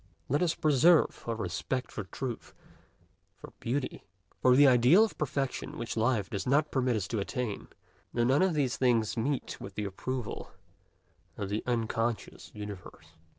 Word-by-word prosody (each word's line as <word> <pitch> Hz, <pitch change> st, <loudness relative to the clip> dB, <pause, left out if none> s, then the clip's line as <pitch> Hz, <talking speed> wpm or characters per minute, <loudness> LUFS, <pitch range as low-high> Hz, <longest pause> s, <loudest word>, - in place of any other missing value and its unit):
Let 145 Hz, +5 st, +2 dB
us 170 Hz, -2 st, +2 dB
preserve 155 Hz, +3 st, +4 dB
our 115 Hz, -, -1 dB
respect 110 Hz, +6 st, -3 dB
for 105 Hz, -, -5 dB
truth, 120 Hz, +5 st, -6 dB, 0.8 s
for -, -, -13 dB
beauty, 130 Hz, +3 st, -3 dB, 0.4 s
for 125 Hz, -1 st, +6 dB
the 145 Hz, +2 st, +7 dB
ideal 130 Hz, -, +6 dB
of 225 Hz, -, -1 dB
perfection 140 Hz, -3 st, -3 dB
which 115 Hz, -, -4 dB
life 110 Hz, -3 st, +1 dB
does 100 Hz, +1 st, -4 dB
not 150 Hz, +3 st, +2 dB
permit 130 Hz, -3 st, +1 dB
us 100 Hz, -3 st, -2 dB
to 110 Hz, -, -1 dB
attain, 115 Hz, +1 st, -3 dB, 0.4 s
though 120 Hz, -, +1 dB
none 130 Hz, +4 st, +3 dB
of 185 Hz, -3 st, +2 dB
these 130 Hz, -6 st, 0 dB
things 115 Hz, -4 st, +2 dB
meet 130 Hz, +3 st, -2 dB
with 95 Hz, -, -8 dB
the 105 Hz, -, -2 dB
approval 120 Hz, +4 st, -5 dB, 0.9 s
of 100 Hz, -2 st, -4 dB
the 105 Hz, +2 st, -1 dB
unconscious 115 Hz, -1 st, -2 dB
universe. 100 Hz, -6 st, -9 dB
120 Hz, 155 wpm, -30 LUFS, 110-135 Hz, 0.9 s, the